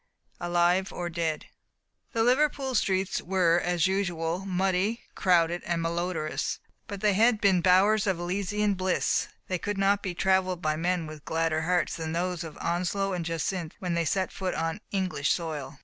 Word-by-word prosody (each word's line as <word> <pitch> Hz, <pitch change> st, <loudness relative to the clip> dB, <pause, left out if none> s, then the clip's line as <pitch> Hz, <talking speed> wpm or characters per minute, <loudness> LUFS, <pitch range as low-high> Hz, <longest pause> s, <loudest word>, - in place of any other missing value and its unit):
"alive 175 Hz, +2 st, +2 dB
or 175 Hz, -1 st, -4 dB
dead." 165 Hz, -2 st, -2 dB, 0.7 s
The 225 Hz, -, +1 dB
Liverpool 270 Hz, +1 st, +2 dB
streets 195 Hz, -4 st, +1 dB
were, 175 Hz, -2 st, +2 dB
as 175 Hz, -2 st, +1 dB
usual, 180 Hz, -1 st, -1 dB
muddy, 190 Hz, +4 st, 0 dB
crowded, 175 Hz, -2 st, +2 dB
and 170 Hz, -1 st, -1 dB
malodorous; 165 Hz, -1 st, -2 dB, 0.3 s
but 200 Hz, -1 st, -7 dB
had 215 Hz, +3 st, +4 dB
they -, -, -9 dB
been 195 Hz, -4 st, +3 dB
bowers 195 Hz, +4 st, +4 dB
of 190 Hz, -3 st, +1 dB
Elysian 200 Hz, +3 st, 0 dB
bliss 185 Hz, -1 st, 0 dB, 0.2 s
they 185 Hz, -2 st, -2 dB
could 205 Hz, +2 st, -3 dB
not 195 Hz, +1 st, +2 dB
be 185 Hz, -3 st, -4 dB
trav 190 Hz, +1 st, +3 dB
ersed 180 Hz, -2 st, -3 dB
by 155 Hz, -3 st, 0 dB
men 175 Hz, +1 st, 0 dB
with 155 Hz, -1 st, -9 dB
gladder 160 Hz, -1 st, 0 dB
hearts 175 Hz, 0 st, +1 dB
than 160 Hz, -1 st, -4 dB
those 175 Hz, 0 st, -1 dB
of 160 Hz, -2 st, -9 dB
Onslow 185 Hz, +3 st, -1 dB
and 175 Hz, -2 st, -2 dB
Jacynth 165 Hz, +1 st, -3 dB
when 180 Hz, -2 st, -3 dB
they 170 Hz, 0 st, 0 dB
set 190 Hz, +3 st, 0 dB
foot 185 Hz, -1 st, -3 dB
on 165 Hz, +5 st, -2 dB
Eng 190 Hz, -2 st, 0 dB
lish 145 Hz, -4 st, 0 dB
soil. 150 Hz, -5 st, -3 dB
180 Hz, 175 wpm, -28 LUFS, 165-195 Hz, 0.7 s, had